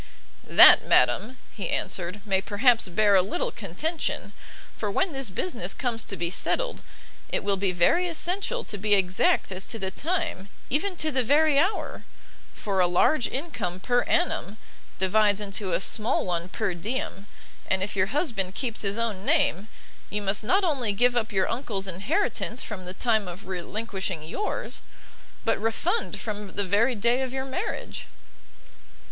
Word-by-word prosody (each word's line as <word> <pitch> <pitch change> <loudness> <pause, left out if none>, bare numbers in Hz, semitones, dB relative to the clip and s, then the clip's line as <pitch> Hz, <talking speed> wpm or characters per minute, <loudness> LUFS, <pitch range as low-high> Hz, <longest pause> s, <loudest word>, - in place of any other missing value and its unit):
"That, - - +9
madam," 200 - +3
he 205 - -5
answered, 180 +3 -2
"may 190 -2 +2
perhaps 225 +3 +3
bear 205 +3 +3
a 190 - +6
little 350 - -2
contention: 325 -6 -3 0.4
for 210 - -3
when 355 - 0
this 270 -4 -1
business 350 - -3
comes 235 -4 -2
to 195 - -3
be 170 +1 -2
settled, - - -1 0.5
it - - -2
will 200 0 +1
be 195 -1 0
very 180 - +3
essential 380 +8 -1
to 205 - -5
be 205 +1 +3
exact 190 0 +2
as 185 0 -3
to 225 - -5
the 190 -3 -3
time, 310 - -2 0.2
even 360 +8 0
to 315 -2 -1
the 260 -2 +1
very 290 +3 +4
hour; 375 +8 -1 0.5
for 195 -2 -2
a 180 - +5
large 230 - +3
income 260 - -4
per 245 +5 +2
annum, 280 - 0 0.4
divides 205 +2 +3
into 200 -2 -3
a 170 - +2
small 215 +3 +1
one 175 -1 -2
per 185 - -2
diem: 205 - -4 0.4
and 190 0 +1
if 205 - -4
your 190 -1 +2
husband 225 - -1
keeps 245 -5 -3
his 200 +1 -1
own 220 -5 -2
name, 285 - +2 0.4
you 210 0 -2
must 200 +2 0
not 380 - +2
only 265 - +1
give 245 +4 +3
up 225 -2 0
your 190 -2 +1
uncle's 225 -6 -3
inheritance 200 +5 -1
from 190 -4 -7
the 180 - -6
time 220 -4 +1
of 180 +2 -8
relinquishing 190 -1 -4
yours, 420 - -3 0.6
but - - +1
refund 205 -3 -1
from 210 -2 -6
the 200 - -1
very 220 +7 +2
day 235 +4 +2
of 260 -1 -2
your 265 0 -3
marriage." 365 - -5
210 Hz, 165 wpm, -26 LUFS, 190-265 Hz, 0.6 s, That